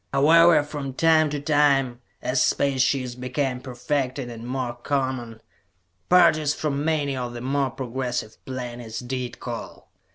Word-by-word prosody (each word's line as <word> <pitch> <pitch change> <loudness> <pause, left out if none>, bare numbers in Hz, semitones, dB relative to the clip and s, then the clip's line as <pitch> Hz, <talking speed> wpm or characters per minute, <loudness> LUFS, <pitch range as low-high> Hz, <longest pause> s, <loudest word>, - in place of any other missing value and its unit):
However, 160 +3 +6
from 145 -3 -6
time 160 -1 +4
to 145 0 -3
time, 140 -4 +2 0.2
as 130 +1 +1
space 140 -2 +2
ships 130 -2 +1
became 125 +1 -2
perfected 130 0 -3
and 115 0 -8
more 125 -1 -2
common, 120 -3 -3 0.7
parties 160 -4 +5
from 145 -2 -2
many 150 -3 0
of 125 -2 -4
the 120 - -7
more 135 +1 0
progressive 125 -3 -4
planets 120 -3 -6
did 125 0 -4
call. - - -7
130 Hz, 135 wpm, -24 LUFS, 125-145 Hz, 0.7 s, However